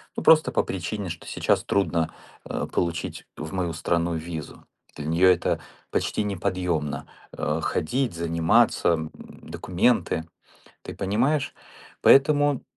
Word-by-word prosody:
Ну, - - -4
просто 155 -5 +6
по - - +2
причине, 95 +1 -4
что 85 - -7
сейчас - - +1
трудно, 85 -5 0 0.3
э, - - -3
получить 85 -1 -2
в 80 +4 -6
мою 90 -3 -1
страну 85 +1 0
визу. 80 -2 -7 0.3
Для 75 - -6
неё 85 +3 +4
это 90 - +2 0.3
почти 105 - -1
неподъемно, 85 -7 -2 0.3
э, - - -1
ходить 125 +4 0
заниматься, 85 +7 +3
м, 80 -2 0 0.3
документы, 80 - 0 0.6
ты - - -8
понимаешь. 120 +10 0 0.5
Поэтому 145 0 +5
85 Hz, 120 wpm, -25 LUFS, 80-110 Hz, 0.6 s, просто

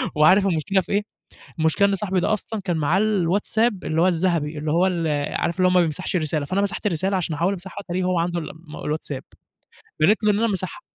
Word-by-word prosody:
وعارف 185 +6 +5
المشكلة 185 +3 +1
في - - -10
إيه، 200 +1 +2 0.6
المشكلة 160 +5 +3
إن 200 - +1
صاحبي 190 -2 -1
ده 215 - +1
أصلًا 215 0 -3
كان 175 -4 -1
معاه 160 +5 +2
الWhatsApp 210 +3 +1
اللي 160 +1 0
هو 185 - +5
الذهبي 165 -4 0
اللي 150 0 -2
هو 175 +3 +3
ال 170 -3 -1 0.3
عارف 170 +2 -1
اللي 185 0 +4
هو - - +2
ما 180 - +5
بيمسحش 175 +4 -2
الرسالة، 155 -3 0
فأنا 190 +7 0
مسحت 200 +2 -2
الرسالة 190 +2 0
عشان 165 -3 -2
أحاول 175 +5 +1
أمسحه 190 +1 -8
تقريبًا 180 +1 -1
هو 180 -2 +1
عنده 170 0 -1
الم 160 - -8 0.2
الWhatsApp، 150 -3 -4 0.8
بانت 210 +8 +3
له 210 - +4
إن 205 - 0
أنا 230 - +2
ماسحها. 190 -3 -4
180 Hz, 220 wpm, -23 LUFS, 160-195 Hz, 0.8 s, وعارف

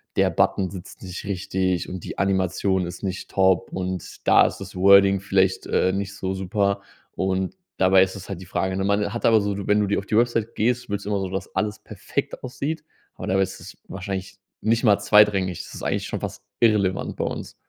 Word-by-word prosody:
„Der - - +3
Button 95 -1 +1
sitzt 95 -1 -10
nicht 90 -1 -7
richtig 95 -2 -1
und 90 -2 -7
die - - -7
Animation 95 -1 +1
ist 85 - -9
nicht 95 -1 -4
top 95 -2 +2
und 95 -1 -5
da - - +7
ist - - -5
das - - -9
Wording 100 +1 +6
vielleicht, 95 -1 +1
äh, 95 - +2
nicht 100 0 -3
so 95 -1 -3
super.” 100 +1 0 0.3
Und, 95 - -1 0.2
dabei 95 0 +6
ist 95 0 +1
es 95 - -9
halt 95 -3 -6
die 95 - -11
Frage, 95 +1 -1
ne? 95 - -1
Man 100 0 +1
hat 120 - -4
aber 110 -1 +6
so 100 -1 -1
wenn 105 0 +4
du 105 - +2
die 100 +1 0
auf 100 - -9
die 110 - +1
Website 115 -1 +1
gehst, 120 +1 0
willst 100 -1 -3
du - - -4
immer 100 - +1
so, 95 -1 -3
dass 95 0 -5
alles 105 0 -1
perfekt - - -5
aussieht, 150 +5 -4 0.3
aber - - -7
dabei 95 +1 +3
ist 95 - -6
es - - -11
wahrscheinlich 95 0 -5 0.2
nicht 115 +2 +1
mal 105 -3 +5
zweitrangig. 100 -4 +3
Das - - -11
ist - - -8
eigentlich - - -1
schon - - -3
fast - - -6 0.2
irrelevant 105 -5 +2
bei - - -1
uns. - - -5
95 Hz, 215 wpm, -24 LUFS, 95-105 Hz, 0.3 s, da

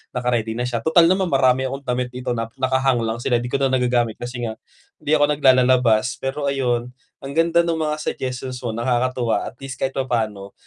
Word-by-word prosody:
naka-ready 120 -3 -1
na 120 - -2
siya," 120 -2 -2
tutal 160 +7 +4
naman 190 -1 +1
marami 130 -2 +2
akong 135 +2 -6
damit 125 -1 -1
dito 125 0 -4
nap 115 -1 -4
naka-hang 130 -2 +1
lang 115 +1 -2
sila 120 0 0
'di 120 +1 -2
ko - - +1
na 135 - +3
nagagamit 120 -3 +1
kasi 120 0 -7
nga 110 - -5 0.5
hindi 150 - -3
ako 145 - +4
naglalalabas. 130 -4 +3
Pero 140 +2 -3
ayun, 125 -3 -1 0.3
ang 135 +1 -7
ganda 165 +1 +3
ng 170 - 0
mga 155 -1 -1
suggestions 130 -2 -4
mo, 120 - -3
nakakatuwa 120 0 0
at 125 - -20
least 130 -1 -7
kahit 135 0 -1
papano 110 -6 -2
125 Hz, 195 wpm, -21 LUFS, 120-135 Hz, 0.5 s, tutal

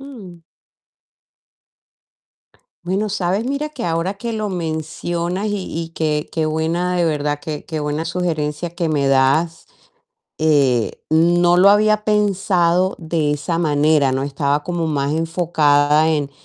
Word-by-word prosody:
Mm. 205 -12 -12 2.4
Bueno, 195 +4 -1
¿sabes?, 195 +1 -1
mira 280 +4 -2
que 265 -9 -6
ahora 170 +3 -1
que 230 +3 -5
lo 215 -1 -2
mencionas 170 +2 -3
y 205 - -1 0.3
y 165 - -7
qué 155 -2 -2
qué 160 -1 -1
buena 165 +3 -1
de 175 - +2
verdad, 145 -2 -1
qué 150 -2 -5
qué 160 -2 -4
buena 150 +2 -2
sugerencia 165 -2 -2
que 170 -1 -2
me 145 -3 +1
das, 135 +5 +2 0.7
eh, 140 -7 +2 0.2
no 175 +2 +4
lo 190 +2 +6
había 215 +1 +3
pensado 190 -4 +1
de 160 -3 -1
esa 150 +3 -2
manera, 150 -3 +2
¿no? 135 - -1
Estaba 140 +1 -1
como 175 -1 -2
más 145 -2 -1
enfocada 155 -2 +2
en, 145 -3 -1
165 Hz, 135 wpm, -19 LUFS, 150-180 Hz, 2.4 s, lo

